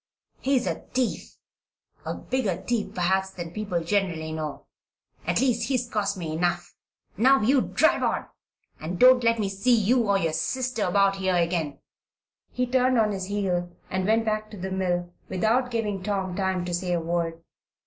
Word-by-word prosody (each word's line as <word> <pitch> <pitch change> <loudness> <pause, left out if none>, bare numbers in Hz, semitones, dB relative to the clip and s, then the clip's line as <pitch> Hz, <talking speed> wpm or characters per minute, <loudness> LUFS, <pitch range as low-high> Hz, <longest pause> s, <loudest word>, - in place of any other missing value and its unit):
He's 265 -2 +1
a - - -2 0.2
thief 255 -2 -1 0.7
a - - -2
bigger 245 -8 -1
thief, 235 -2 -2
perhaps, 190 +2 +1
than 175 -3 -7
people 190 -4 -2
generally 170 -4 -1
know. 155 -2 -5 0.6
At - - +2
least, 240 -3 +1
he's 250 -3 0
cost 205 -3 -1
me 165 -3 -4
enough. 175 +2 -1 0.4
Now, 265 +3 +5
you 260 +4 +4
drive - - +2
on - - 0 0.5
and 170 +3 -4
don't 255 +2 +7
let 230 0 +3
me 210 -3 0
see 195 +6 +2
you 230 +1 +2
or 200 - +4
your 165 -4 0
sister 235 +8 -1
about 195 +1 +3
here 190 -1 +1
again." 170 -4 0 0.7
He 250 - 0
turned 255 0 +2
on 215 -2 +3
his 190 -2 -3
heel 185 -3 -1 0.2
and 185 0 -1
went 225 +1 +3
back 215 0 -1
to 210 - -10
the 190 +1 -5
mill 175 -2 -1 0.2
without 225 +7 +1
giving 210 -5 -2
Tom 190 -2 -2
time 190 -2 -1
to 175 - -4
say 180 +1 -1
a 175 - +1
word. 165 0 -2
195 Hz, 175 wpm, -26 LUFS, 175-230 Hz, 0.7 s, don't